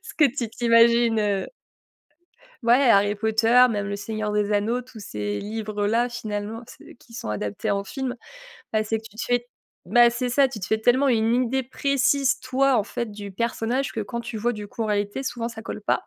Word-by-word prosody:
Ce -, -, -10 dB
que 300 Hz, -, +4 dB
tu 250 Hz, -3 st, 0 dB
t'imagines, 230 Hz, 0 st, +4 dB
heu 205 Hz, -2 st, 0 dB, 1.2 s
Ouais, 245 Hz, +3 st, +4 dB
Harry 205 Hz, -1 st, +4 dB
Potter, 225 Hz, +3 st, +4 dB
même 205 Hz, -2 st, -2 dB
le 200 Hz, -, -3 dB
Seigneur 215 Hz, +1 st, -4 dB
des 210 Hz, 0 st, 0 dB
Anneaux, 215 Hz, +4 st, +1 dB
tous 250 Hz, -3 st, -13 dB
ces 105 Hz, -, -4 dB
livres-là, 215 Hz, +2 st, -1 dB
finalement, 215 Hz, -1 st, -5 dB
c'est -, -, -14 dB
qui 235 Hz, -, -21 dB
sont 230 Hz, -, -6 dB
adaptés 105 Hz, -1 st, -3 dB
en 200 Hz, 0 st, -1 dB
film, 260 Hz, +3 st, -4 dB, 0.6 s
bah 215 Hz, 0 st, +1 dB
c'est 220 Hz, +1 st, -1 dB
que 220 Hz, -, -11 dB
tu 215 Hz, -1 st, -14 dB
te -, -, -2 dB
fais 245 Hz, 0 st, 0 dB, 0.4 s
bah 240 Hz, 0 st, +5 dB
c'est 245 Hz, +1 st, -2 dB
ça, 270 Hz, +2 st, +4 dB
tu 245 Hz, -4 st, -7 dB
te 190 Hz, -, -5 dB
fais 220 Hz, -, +1 dB
tellement 245 Hz, +5 st, +3 dB
une 225 Hz, -2 st, +2 dB
idée 265 Hz, +2 st, -1 dB
précise, 275 Hz, +1 st, +1 dB
toi, 260 Hz, 0 st, +2 dB
en 210 Hz, -, +2 dB
fait, 230 Hz, +1 st, -5 dB
du 205 Hz, -1 st, -8 dB
personnage, 235 Hz, +5 st, -1 dB
que 225 Hz, -, -4 dB
quand 235 Hz, +3 st, -4 dB
tu 235 Hz, -1 st, -6 dB
vois, 240 Hz, +3 st, 0 dB
du 210 Hz, -2 st, -7 dB
coup, 225 Hz, +2 st, -4 dB
en -, -, -1 dB
réalité, 205 Hz, +4 st, -1 dB
souvent 240 Hz, -3 st, -3 dB
ça 225 Hz, -1 st, -9 dB
colle 215 Hz, -, -6 dB
pas, -, -, 0 dB
225 Hz, 210 wpm, -24 LUFS, 210-245 Hz, 1.2 s, bah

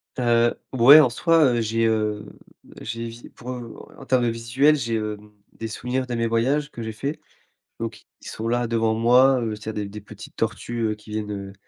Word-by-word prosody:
Heu, 120 Hz, -1 st, +2 dB, 0.2 s
ouais, 135 Hz, +5 st, +9 dB
en 140 Hz, -, +5 dB
soi, 160 Hz, -1 st, +3 dB
heu, 115 Hz, -, 0 dB
j'ai, 115 Hz, +1 st, 0 dB
heu, 105 Hz, -2 st, 0 dB, 0.6 s
j'évi 115 Hz, +1 st, -7 dB
pour, 125 Hz, -, -11 dB
heu, 120 Hz, -2 st, -7 dB, 0.2 s
en 135 Hz, -, -11 dB
termes 130 Hz, -2 st, +2 dB
de 120 Hz, -, +2 dB
visuel, 120 Hz, +6 st, +2 dB
j'ai, 115 Hz, -5 st, -2 dB
hem, 105 Hz, -1 st, -5 dB, 0.2 s
des 115 Hz, -, -6 dB
souvenirs 125 Hz, +3 st, -3 dB
de 120 Hz, -, -3 dB
mes 115 Hz, 0 st, 0 dB
voyages 135 Hz, +6 st, 0 dB
que 120 Hz, -, -8 dB
j'ai 110 Hz, -, -4 dB
fait, 140 Hz, +8 st, -4 dB, 0.6 s
donc 115 Hz, -2 st, -6 dB, 0.2 s
ils -, -, -12 dB
sont 110 Hz, -, -5 dB
là, 120 Hz, 0 st, 0 dB
devant 115 Hz, -1 st, +1 dB
moi, 125 Hz, +3 st, +4 dB
heu, 110 Hz, -2 st, -2 dB
c'est 105 Hz, -, -15 dB
il -, -, -11 dB
y -, -, 0 dB
a 110 Hz, -, -4 dB
des 100 Hz, -, -7 dB
des 105 Hz, +1 st, -9 dB
petites 100 Hz, -, -12 dB
tortues, 120 Hz, -1 st, -3 dB
heu, 105 Hz, -, -2 dB
qui 105 Hz, +1 st, -18 dB
viennent, 105 Hz, -1 st, -3 dB
heu, 100 Hz, -1 st, -6 dB
115 Hz, 220 wpm, -23 LUFS, 110-125 Hz, 0.6 s, ouais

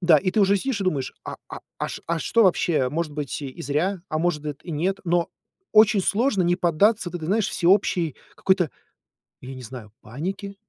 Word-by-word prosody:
да, 170 Hz, -4 st, +6 dB
и 185 Hz, -, -1 dB
ты 215 Hz, -, +1 dB
уже 200 Hz, 0 st, +4 dB
сидишь 225 Hz, +1 st, -2 dB
и -, -, -1 dB
думаешь, 145 Hz, -8 st, -1 dB
а -, -, -6 dB
а -, -, -8 dB, 0.2 s
а -, -, -2 dB
шт -, -, -7 dB
а 170 Hz, 0 st, -1 dB
что 230 Hz, +8 st, +3 dB
вообще, 165 Hz, -7 st, +2 dB
может 155 Hz, +2 st, -3 dB
быть 145 Hz, -1 st, -4 dB
и 135 Hz, -2 st, -7 dB
зря, 165 Hz, +7 st, -1 dB
а 155 Hz, -, -1 dB
может 150 Hz, -4 st, -2 dB
и 175 Hz, -, -7 dB
нет. 180 Hz, +6 st, -1 dB
Но 175 Hz, -1 st, +1 dB, 0.4 s
очень 215 Hz, -1 st, +6 dB
сложно 210 Hz, 0 st, +1 dB
не 175 Hz, +1 st, +2 dB
поддаться 180 Hz, +4 st, +2 dB
вот -, -, -5 dB
этой, 160 Hz, -3 st, -6 dB
знаешь, 210 Hz, +4 st, +1 dB
всеобщей 175 Hz, -4 st, +2 dB, 0.2 s
какой-то, 185 Hz, -5 st, +1 dB, 0.7 s
ну 130 Hz, -, -9 dB
я 135 Hz, -, -7 dB
не 130 Hz, -, -9 dB
знаю, 120 Hz, -3 st, -10 dB
панике, 190 Hz, -, -5 dB
175 Hz, 210 wpm, -24 LUFS, 150-195 Hz, 0.7 s, да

